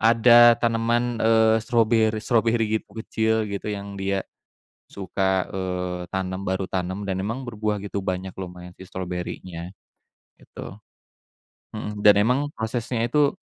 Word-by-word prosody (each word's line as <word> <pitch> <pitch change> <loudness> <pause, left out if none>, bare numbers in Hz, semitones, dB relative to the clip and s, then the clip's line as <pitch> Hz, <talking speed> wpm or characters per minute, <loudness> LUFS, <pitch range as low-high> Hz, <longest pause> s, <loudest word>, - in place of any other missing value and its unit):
ada 120 +1 +7
tanaman, 120 +1 +1
eee, 110 0 +5
strawberry-strawberry 115 -1 +2 0.2
kecil 110 -1 0
gitu 100 0 -5
yang 100 0 -6
dia 95 0 -1 0.6
suka, 95 0 -1
eee, 90 -1 -3
tanam, 95 0 -3
baru 95 0 -1
tanam, 95 +2 -3
dan 95 - 0
memang 115 +6 -3
berbuah 105 -2 -2
gitu, 100 0 -4
banyak 95 0 -3
lumayan 90 -1 -8
sih - - -12
strawberrynya. 90 -1 -6 0.7
gitu, 100 - -10 1.0
heeh, 105 -1 -4
dan 105 0 +7
emang 125 +6 +1
prosesnya 115 +1 -2
itu 145 +5 +2
105 Hz, 120 wpm, -24 LUFS, 95-115 Hz, 1.0 s, ada